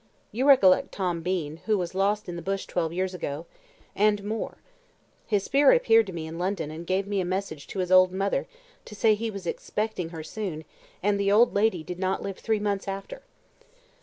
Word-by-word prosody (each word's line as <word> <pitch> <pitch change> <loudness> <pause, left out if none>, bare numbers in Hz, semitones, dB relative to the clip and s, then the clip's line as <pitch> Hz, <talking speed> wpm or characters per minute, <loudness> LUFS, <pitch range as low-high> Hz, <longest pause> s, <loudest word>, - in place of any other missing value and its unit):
You 255 +6 0
recollect 200 -10 +6
Tom 180 -4 -2
Bean, 165 -4 -2
who 215 -1 +3
was 175 -2 -3
lost 205 +3 0
in 175 - -5
the 170 - -5
bush 195 +1 -2
twelve 165 -2 -1
years 185 +2 -2
ago, 160 -2 -5 0.5
and 205 0 +2
more; 215 +2 -4 0.7
his 205 -3 +1
spirit 280 +4 +5
appeared 225 -1 +4
to - - -5
me 165 -3 -5
in 160 +1 -7
London, 180 -4 -2
and 165 +2 -8
gave 190 +1 +1
me 200 -1 -1
a - - -1
message 180 -5 -4
to - - -8
his 185 -1 -1
old 185 0 +7
mother, 195 +2 -1 0.4
to 210 - -10
say 215 +1 +4
he 225 +2 -2
was 200 -4 -7
expecting 210 0 -3
her 165 -2 -7
soon; 160 -3 -5 0.4
and 205 0 +2
the 200 0 +2
old 230 +4 +5
lady 200 -5 +1
did 180 +2 -7
not 190 0 -1
live 195 -1 -5
three 220 -1 0
months 205 -1 -2
after." 195 - -6
195 Hz, 205 wpm, -26 LUFS, 175-210 Hz, 0.7 s, old